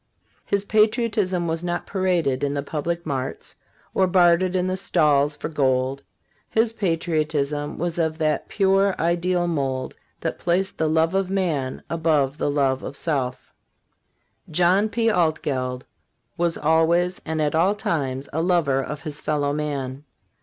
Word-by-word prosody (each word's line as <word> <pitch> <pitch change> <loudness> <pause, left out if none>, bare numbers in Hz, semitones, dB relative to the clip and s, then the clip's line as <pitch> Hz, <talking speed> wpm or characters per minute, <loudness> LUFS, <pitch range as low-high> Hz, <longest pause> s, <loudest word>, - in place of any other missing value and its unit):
His 200 0 0
patriotism 215 -5 +1
was 165 +1 -2
not 175 0 -2
paraded 175 -9 0
in 145 0 0
the 140 - -2
public 170 +4 -3
marts, 135 -3 -4 0.4
or 190 - +3
bartered 180 0 +4
in 180 -1 +1
the 185 0 -1
stalls 150 -6 +2
for - - -4
gold; 135 -2 0 0.5
his 225 0 +1
patriotism 155 -6 -1
was 175 +1 -2
of 160 -1 0
that 155 -2 0
pure 195 -1 +2
ideal 175 +1 +1
mold 135 -5 -2 0.3
that - - -3
placed 185 +3 0
the 160 - +2
love 160 +2 +2
of 195 -1 0
man 165 -9 -1
above 155 -4 +1
the - - 0
love 135 -2 +1
of 140 - -6
self. 135 -6 -2 1.0
John 180 +6 +3
P. 230 +1 0
Altgeld 145 - 0 0.5
was 170 -1 0
always 170 +3 +2
and 160 0 -3
at 150 -1 +1
all 180 +6 +3
times 140 -8 -2
a 160 - 0
lover 165 -6 +2
of 150 +1 -6
his 150 -1 -4
fellow 145 -2 0
man. 140 -2 -3
160 Hz, 145 wpm, -23 LUFS, 145-180 Hz, 1.0 s, bartered